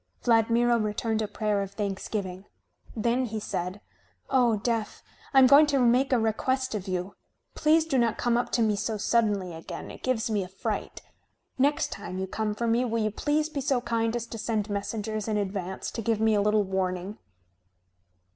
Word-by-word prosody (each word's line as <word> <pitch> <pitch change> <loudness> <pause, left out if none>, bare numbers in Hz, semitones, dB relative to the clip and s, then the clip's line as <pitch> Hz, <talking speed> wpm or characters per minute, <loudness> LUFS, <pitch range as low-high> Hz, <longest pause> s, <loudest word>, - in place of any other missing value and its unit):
Vladmiro 235 +1 +3
returned 220 +1 -1
a 215 - -1
prayer 210 -1 -1
of 195 0 -5
thanksgiving. 195 -2 -4 0.5
Then 235 +3 +1
he 220 0 -4
said: 180 -1 -4 0.5
"O 240 -4 +4
Death, 225 0 -2 0.3
I 275 - +1
am 265 - +9
going 285 +4 +7
to 285 -2 +1
make 250 +2 +3
a 255 - +4
request 260 +4 0
of 205 -2 -4
you. 185 +1 -3 0.4
Please 315 +1 +3
do 275 -5 +1
not 230 -2 +1
come 240 -1 +1
up 240 - 0
to 235 - +3
me 215 -1 +2
so 215 +2 -2
suddenly 205 -4 +1
again. 165 0 -8
It - - -12
gives 255 -3 0
me 215 -3 0
a - - -7
fright. 190 +1 -4 0.6
Next 285 +3 +2
time 185 - -6
you 190 - -2
come 210 +2 -2
for 235 - -2
me 230 +2 +2
will 230 -2 0
you 215 - 0
please 300 +7 0
be 305 -3 -4
so 265 -1 +1
kind 230 -1 -1
as 235 -1 -2
to 230 -1 -8
send 215 -2 -2
messengers 210 +1 -3
in 215 -1 0
advance 190 -2 -3
to 230 - -4
give 225 -1 0
me 220 0 +3
a 205 - +3
little 210 0 +3
warning?" 190 +1 -2
220 Hz, 195 wpm, -27 LUFS, 205-240 Hz, 0.6 s, am